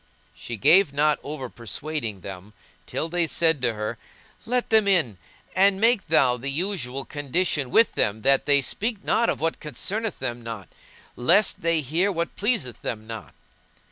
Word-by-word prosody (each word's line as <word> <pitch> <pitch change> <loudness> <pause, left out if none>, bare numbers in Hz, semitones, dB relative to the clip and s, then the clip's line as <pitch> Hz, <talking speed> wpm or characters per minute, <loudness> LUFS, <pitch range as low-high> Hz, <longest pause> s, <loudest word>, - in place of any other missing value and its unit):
She 115 - -7
gave 170 - +5
not 150 +1 +2
over 145 -3 -6
persuading 115 -2 -5
them 95 +2 -9 0.3
till 160 - -3
they 170 0 0
said 160 -3 +2
to 120 -3 0
her, 105 0 -4 0.5
"Let 245 0 -1
them 220 -2 +5
in, 150 - +2 0.4
and 195 +1 +4
make 225 -3 +2
thou 135 -6 +3
the 135 +3 -4
usual 140 -5 -2
condition 145 -1 -1
with 225 - +4
them 105 +1 -1
that 135 +1 +4
they 140 -1 +5
speak 215 - -3
not 235 +1 +2
of - - -1
what 165 +1 -1
concerneth 200 - -3
them 120 -2 -4
not, 115 -6 -7 0.5
lest 180 +12 +3
they 165 -1 +2
hear 165 +9 0
what 170 -2 -3
pleaseth 205 - -1
them 110 -2 -5
not." 110 -10 -9
150 Hz, 165 wpm, -24 LUFS, 120-190 Hz, 0.5 s, gave